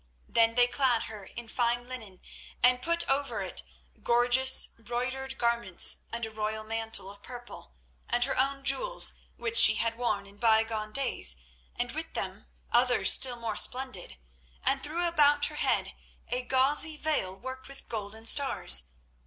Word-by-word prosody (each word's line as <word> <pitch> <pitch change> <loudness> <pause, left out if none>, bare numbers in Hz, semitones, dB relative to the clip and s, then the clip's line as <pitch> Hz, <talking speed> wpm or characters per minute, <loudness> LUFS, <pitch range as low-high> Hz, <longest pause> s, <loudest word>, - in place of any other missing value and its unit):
Then 230 0 +2
they 245 0 +5
clad 245 -2 0
her 210 -3 -9
in 235 +4 -10
fine 240 +1 -1
linen, 220 -8 -8 0.4
and 250 0 +4
put 335 +4 0
over 270 -7 -1
it 185 - -2 0.4
gorgeous, 245 +2 +4
broidered 250 +3 -6
garments, 235 -6 +2
and 235 0 -4
a 220 - -9
royal 215 0 -4
mantle 225 -3 -4
of 200 0 -13
purple, 240 - -11 0.3
and 240 0 +1
her - - 0
own 275 +1 -1
jewels - - +2 0.2
which 230 -1 -2
she 215 -1 +9
had 230 0 -1
worn 215 -5 -1
in 200 +1 -16
bygone 220 -1 +1
days, 235 - -1 0.4
and - - -3
with - - -7
them - - -5 0.2
others 245 +1 +4
still 255 -2 +4
more 230 -3 -5
splendid, 250 - +1 0.5
and 270 0 0
threw 330 +5 -1
about 290 -3 +3
her 300 - -6
head - - 0 0.4
a 250 +1 -1
gauzy 270 +5 +1
veil 295 -13 -2
worked 260 +3 -9
with 275 0 -13
golden 220 0 -6
stars. 65 - +4
240 Hz, 155 wpm, -28 LUFS, 220-265 Hz, 0.5 s, she